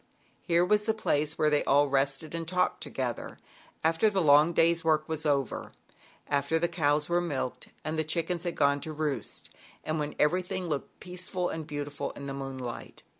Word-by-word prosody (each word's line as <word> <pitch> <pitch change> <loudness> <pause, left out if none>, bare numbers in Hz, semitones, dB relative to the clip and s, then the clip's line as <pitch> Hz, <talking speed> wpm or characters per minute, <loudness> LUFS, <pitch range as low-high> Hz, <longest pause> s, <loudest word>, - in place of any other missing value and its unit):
Here 170 0 +3
was 210 +2 +2
the 220 0 +1
place 150 -7 0
where 155 -1 +3
they 150 - +3
all 145 +1 +4
rested 140 +3 0
and 165 -1 -4
talked 180 +1 +1
together 125 -3 -4 0.5
after 165 +7 +3
the 195 -2 0
long 150 0 +6
day's 170 0 +3
work 155 -1 +2
was 160 -1 -1
over, 140 -4 -1 0.5
after 140 +2 +1
the 170 +1 +2
cows 150 -3 +1
were 175 0 +2
milked 140 -7 -3 0.2
and 155 +1 -1
the - - +2
chickens 165 +2 -1
had 175 -1 -2
gone 140 0 +3
to 155 - -4
roost, 150 -2 -3 0.3
and 155 0 -2
when 150 0 -3
everything 180 +3 +1
looked 150 -5 -4
peaceful 180 0 -2
and 160 -2 -5
beautiful 145 -1 -4
in 140 - -8
the 135 - -4
moonlight. 130 -3 -6
155 Hz, 180 wpm, -29 LUFS, 145-170 Hz, 0.5 s, long